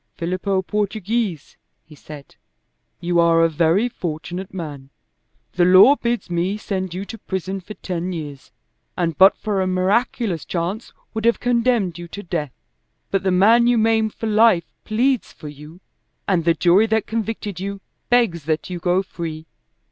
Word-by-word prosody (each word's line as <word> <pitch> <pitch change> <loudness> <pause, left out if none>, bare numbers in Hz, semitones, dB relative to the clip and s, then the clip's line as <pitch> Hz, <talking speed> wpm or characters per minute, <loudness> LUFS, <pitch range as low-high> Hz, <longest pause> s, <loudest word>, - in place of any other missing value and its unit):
"Filippo 185 +3 -1
Portoghese," 210 -3 -2 0.3
he 160 - -16
said, 145 -1 -12 0.7
"you 175 0 +1
are 165 0 +4
a - - +5
very 165 +7 +2
fortunate 175 -2 -6
man. 145 -7 -7 0.6
The 175 - +2
law 185 +10 +7
bids 240 -3 -2
me 175 +3 -1
send 190 -4 -4
you 190 +2 -4
to 225 +2 -9
prison 190 0 -4
for 210 +4 -10
ten 180 0 -4
years, 145 -9 -7 0.5
and 165 -3 -1
but 190 +4 +6
for 205 -3 -1
a 185 - 0
miraculous 185 - 0
chance 180 +6 -4 0.2
would 220 0 -3
have 235 - +3
condemned 235 -7 +1
you 175 - -7
to 200 +4 -8
death. 155 -7 -4 0.6
But 195 - +1
the 190 - 0
man 220 +6 +5
you 245 -1 +3
maimed 220 -1 +2
for - - -5
life 215 -5 +3
pleads 250 +4 0
for 150 - -10
you, 150 +5 -13 0.5
and 175 -4 +1
the 170 -1 +3
jury 180 +7 +4
that 220 0 +1
convicted 220 -4 -4
you 200 +1 -5 0.3
begs 225 -11 +2
that 160 +3 -2
you 180 - -4
go 180 +2 +1
free. 160 -4 -7
185 Hz, 165 wpm, -21 LUFS, 170-220 Hz, 0.7 s, law